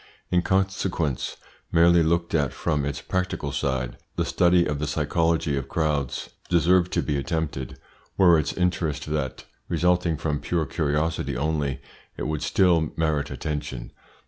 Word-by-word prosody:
In 90 - +4
consequence, 95 -6 -1 0.3
merely 85 +1 +5
looked 85 +1 +1
at 70 -5 +1
from 75 -4 -1
its 70 0 -3
practical 90 -6 -2
side, 65 -4 -2 0.2
the - - 0
study 90 -1 +3
of 75 -1 -2
the 75 - -2
psychology 80 +1 +1
of 70 0 -4
crowds 75 -5 -1 0.2
deserved 90 +1 +3
to - - +1
be 75 -2 -1
attempted. 70 -3 -3 0.4
Were 85 -4 +6
its 75 - -1
interest 85 -5 -1
that 75 -4 -3 0.2
resulting 85 -1 +2
from 75 -1 -1
pure 80 +2 -1
curiosity 75 -2 -1
only, 75 -1 -1 0.4
it - - -4
would 75 -1 -2
still 85 -5 +3
merit 75 -3 0
attention. 65 -3 -4
80 Hz, 145 wpm, -25 LUFS, 70-85 Hz, 0.4 s, Were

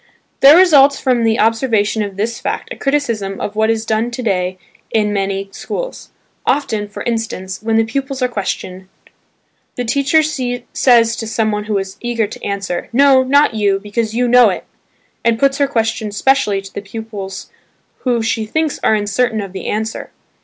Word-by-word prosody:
There 285 +4 +8
results 285 -6 +6
from 250 -3 +1
the 225 0 +2
observation 225 -2 +1
of 200 -2 -4
this 230 +3 -2
fact - - -4
a - - -10
criticism 230 -9 -1
of 205 - -4
what 220 +1 +2
is 225 0 0
done 225 +1 0
to 245 +1 -6
day 185 -3 -1 0.3
in 210 -2 +1
many 195 0 -2
schools. - - -6 0.3
Often, 220 -8 0
for 205 - -8
instance 220 -5 -3
when 225 0 0
the 225 - +4
pupils 270 +4 -3
are - - +3
questioned, 190 -4 -5 0.9
the 245 - -3
teacher 280 +6 +2
says 245 -4 +1
to 225 - -4
someone 215 -2 -1
who 210 -1 -1
is 195 0 -5
eager 240 -2 0
to 205 - -10
answer, 195 -3 -3
"No, 270 +1 +5
not 280 +1 +3
you, 200 -3 +1
because 215 +2 -3
you 245 +1 +1
know 245 -2 +6
it" 185 - -4 0.6
and 230 -1 +2
puts 275 +2 +2
her 280 - +3
question 225 -4 -1
specially 210 -3 +1
to 195 - -12
the - - -5
pupils 205 -2 -7 0.5
who 240 -3 0
she 225 0 0
thinks 315 +4 -1
are 220 - +4
uncertain 220 +3 0
of 195 -2 -6
the 190 - -6
answer. 220 +1 -3
225 Hz, 175 wpm, -17 LUFS, 205-250 Hz, 0.9 s, There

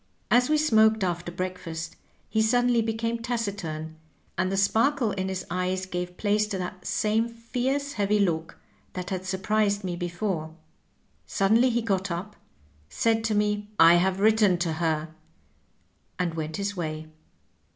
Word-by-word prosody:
As 245 +2 +4
we 305 - +4
smoked 220 -7 +4
after 175 -1 -2
breakfast 175 -3 -5 0.3
he 220 - +1
suddenly 245 +1 +3
became 230 +1 -2
taciturn, 200 -10 -4 0.4
and 185 +1 0
the 195 - -1
sparkle 230 +5 +2
in 190 -1 -2
his 190 -1 -4
eyes 185 +1 -1
gave 180 -1 -5
place 210 0 +1
to 205 -2 -3
the 180 -1 -3
same 220 +4 +1
fierce, 250 +5 -2
heavy 205 -2 +1
look 165 -5 0 0.4
that 180 0 -5
had 185 -1 -3
surprised 205 +2 0
me 180 -2 -2
before. 175 -2 -3 0.7
Suddenly 225 +6 +3
he 235 -1 0
got 195 -3 0
up, 185 +5 -5 0.5
said 225 -1 +1
to 220 -1 +1
me, 210 0 0
^I 170 +1 +8
have 190 +1 +1
written 210 -3 +4
to 170 -2 -1
her,' 160 -1 -1 1.1
and 180 -2 -1
went 155 -1 -4
his 205 0 -2
way. 155 -3 -4
195 Hz, 150 wpm, -26 LUFS, 175-220 Hz, 1.1 s, ^I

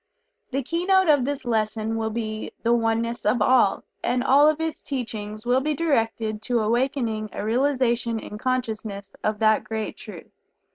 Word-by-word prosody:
The 275 +1 -2
keynote 360 +4 +2
of 285 -4 +4
this 285 -1 -3
lesson 220 -1 -1
will 220 -1 -1
be 215 -1 -4
"The 235 0 +3
Oneness 230 0 0
of 215 +4 +2
All," 250 -6 +3 0.2
and 245 +1 +1
all 285 +3 +6
of 310 0 0
its 320 -1 -3
teachings 215 -5 -5
will 250 +2 +3
be 300 +2 -1
directed 225 -8 0
to 235 +1 0
awakening 230 -1 0
a - - -4
realization 240 -1 +1
in 210 -1 -7
consciousness 220 -5 -3
of 215 0 0
that 215 0 +3
great 220 0 -4
truth. - - -10
235 Hz, 160 wpm, -24 LUFS, 220-265 Hz, 0.2 s, all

